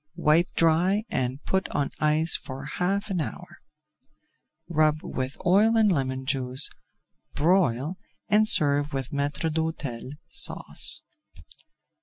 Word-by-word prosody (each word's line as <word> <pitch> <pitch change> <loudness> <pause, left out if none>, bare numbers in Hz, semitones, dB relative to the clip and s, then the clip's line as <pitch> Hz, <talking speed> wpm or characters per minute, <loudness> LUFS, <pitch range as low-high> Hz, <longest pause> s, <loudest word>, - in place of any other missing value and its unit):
Wipe 160 +4 +2
dry 175 +6 +2
and 130 +2 -2
put 190 0 -1
on 145 -1 -2
ice 155 +2 +3
for 135 +1 -7
half 195 +7 -2
an 180 -3 -1
hour. - - -8 1.1
Rub 155 -2 +1
with 130 +1 -5
oil 210 +6 +4
and 215 -2 +4
lemon 130 -4 -2
juice, 130 0 -1 0.6
broil, 155 -1 +1 0.3
and 215 +1 +3
serve 145 -4 +4
with 135 -2 -4
Maître 145 +2 -2
d'Hôtel 145 -6 -4
Sauce. - - +3
155 Hz, 115 wpm, -25 LUFS, 135-180 Hz, 1.1 s, oil